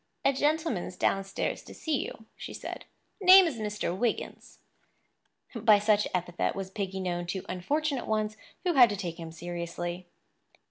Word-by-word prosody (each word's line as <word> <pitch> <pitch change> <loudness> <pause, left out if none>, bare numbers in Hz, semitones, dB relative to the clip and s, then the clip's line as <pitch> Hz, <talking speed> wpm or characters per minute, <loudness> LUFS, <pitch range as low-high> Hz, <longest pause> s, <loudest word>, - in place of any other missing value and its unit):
"A 275 - +5
gentleman's 290 - 0
downstairs 195 0 -1
to - - -12
see 310 -4 -1
you," 225 - -9
she - - -8
said. - - -7 0.4
"Name 375 0 +9
is 310 -8 -2
Mr. 210 -4 -2
Wiggins." 230 +4 -3 1.0
By 220 -3 +5
such 210 0 +2
epithet 175 -1 -1
was 190 -1 -5
Piggy 195 -2 -3
known 175 -2 -2
to 185 +1 -3
unfortunate 280 - -1
ones 215 0 0 0.3
who 360 -2 +1
had 250 -5 +8
to 205 - -2
take 175 -3 -5
him 165 -1 -7
seriously. 175 +1 -5
205 Hz, 150 wpm, -29 LUFS, 180-250 Hz, 1.0 s, Name